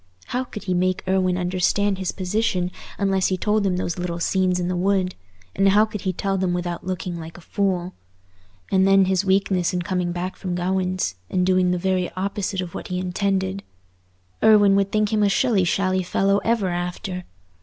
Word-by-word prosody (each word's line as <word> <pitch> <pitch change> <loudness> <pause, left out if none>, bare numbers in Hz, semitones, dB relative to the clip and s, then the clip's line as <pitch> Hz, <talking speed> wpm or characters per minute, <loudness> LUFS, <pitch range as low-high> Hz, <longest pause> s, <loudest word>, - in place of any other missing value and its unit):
How 250 +1 -1
could 215 -4 -9
he 185 - -1
make 185 +1 0
Irwine 185 -1 +2
understand 185 +2 +1
his 185 -2 -1
position 185 -1 -1 0.3
unless 195 -2 +1
he 185 - 0
told 210 +1 +1
him 180 -1 0
those 175 -1 -3
little 175 -1 -3
scenes 185 +1 +1
in 175 - -1
the 180 - -1
wood; 185 0 +1 0.4
and 195 0 +4
how 210 +2 +5
could 210 -2 -7
he 190 - 0
tell 195 +2 -2
them 180 -1 0
without 175 0 -3
looking 180 -1 -4
like 165 0 -9
a - - -12
fool? 185 -1 -1 0.8
And 190 0 +4
then 195 0 +5
his 190 0 +1
weakness 190 -2 +1
in 180 - -1
coming 180 -2 -1
back 180 +2 -4
from 180 -2 -3
Gawaine's, 185 - -1
and 180 -1 +1
doing 185 -1 +3
the 180 - +1
very 185 0 0
opposite 195 0 -2
of 175 -2 -6
what - - -6
he 180 - -3
intended! 190 +1 -1 0.8
Irwine 205 -2 +6
would 200 0 +1
think 215 0 +1
him 215 - +2
a 205 - +4
shilly 210 -2 +2
shally 185 +1 +1
fellow 195 +2 +1
ever 225 -4 0
after. 180 +1 -4
185 Hz, 195 wpm, -23 LUFS, 180-195 Hz, 0.8 s, Irwine